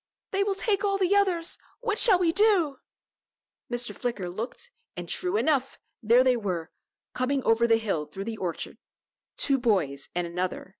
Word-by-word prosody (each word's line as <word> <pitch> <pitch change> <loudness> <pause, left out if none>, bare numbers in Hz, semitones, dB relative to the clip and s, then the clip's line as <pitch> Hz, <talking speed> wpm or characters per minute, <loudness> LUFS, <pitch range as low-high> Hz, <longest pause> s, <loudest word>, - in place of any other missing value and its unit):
They 390 - 0
will 400 -1 -1
take 400 0 0
all 395 -1 +1
the 385 +1 +2
others. 365 -5 +2 0.2
What 445 -3 -1
shall 415 -6 +7
we 350 -2 +2
do?" 365 -8 +3 0.9
Mr. 240 0 0
Flicker 210 -8 -3
looked, 235 - -6 0.3
and, - - -6
true 365 +3 -1
enough, 280 - 0 0.2
there 235 +3 +5
they 255 -1 +3
were, 185 -8 -3 0.4
coming 265 +1 -1
over 225 +1 +3
the 225 -1 +4
hill 195 -9 -2
through 195 - -7
the 225 -1 -5
orchard 180 -5 -5 0.6
two 275 -1 +3
boys, 175 - 0
and 175 0 0
another. 180 +2 -4
255 Hz, 165 wpm, -27 LUFS, -, 0.9 s, shall